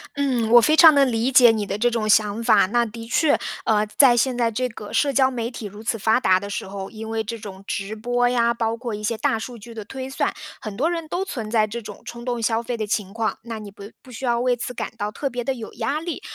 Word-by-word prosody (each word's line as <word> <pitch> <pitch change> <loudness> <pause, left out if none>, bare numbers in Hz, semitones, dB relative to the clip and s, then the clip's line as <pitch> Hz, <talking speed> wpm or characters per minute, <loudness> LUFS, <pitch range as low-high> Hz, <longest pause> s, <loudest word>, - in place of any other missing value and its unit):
嗯。 260 -5 0
嗯， - - -3
我 240 0 +9
非 305 +7 +3
常 320 -1 +9
能 275 -2 +4
理 230 +2 +1
解 245 -2 +7
你 215 -2 -2
的 200 0 -3
这 240 +3 +2
种 225 -2 -1
想 210 +1 +3
法。 - - +5
那 240 +3 +2
的 230 +1 -8
确， 290 +5 +3 0.3
呃， 215 -1 +2
在 260 -4 +7
现 250 +1 +1
在 235 -2 +2
这 250 +3 -1
个 215 -3 -10
社 285 - +2
交 265 0 +4
媒 235 -1 -3
体 235 - -8
如 205 +2 -9
此 225 0 -1
发 220 +3 +3
达 185 -4 +4
的 200 +1 -7
时 195 - -4
候， 195 0 -6
因 220 0 -8
为 225 0 -1
这 230 +2 -5
种 195 -3 -10
直 200 +2 -3
播 245 +2 +1
呀， 235 -1 +2
包 230 -1 -2
括 235 -3 -4
一 210 - -8
些 220 +1 -1
大 225 - +1
数 240 +2 -7
据 230 +2 -12
的 220 -2 -7
推 260 +3 -7
算， 270 - -1 0.3
很 215 -2 -6
多 310 +8 +1
人 335 -2 -3
都 360 +4 -2
存 230 - -5
在 215 -2 +3
这 235 +2 -6
种 - - -10
冲 235 0 -8
动 240 -2 -2
消 225 +1 +1
费 240 0 -3
的 215 -1 -3
情 200 -1 -2
况。 225 -1 -2
那 230 -1 -6
你 210 -1 -9
不 200 +2 -11
不 - - -17
需 245 - -9
要 235 -1 +1
为 250 0 +2
此 250 +1 -5
感 - - -4
到 210 -1 -3
特 275 +5 -3
别 245 -1 -4
地 270 - -1
有 230 -3 -8
压 255 +6 -2
力。 335 +1 -5
230 Hz, 300 characters per minute, -22 LUFS, 215-250 Hz, 0.3 s, 我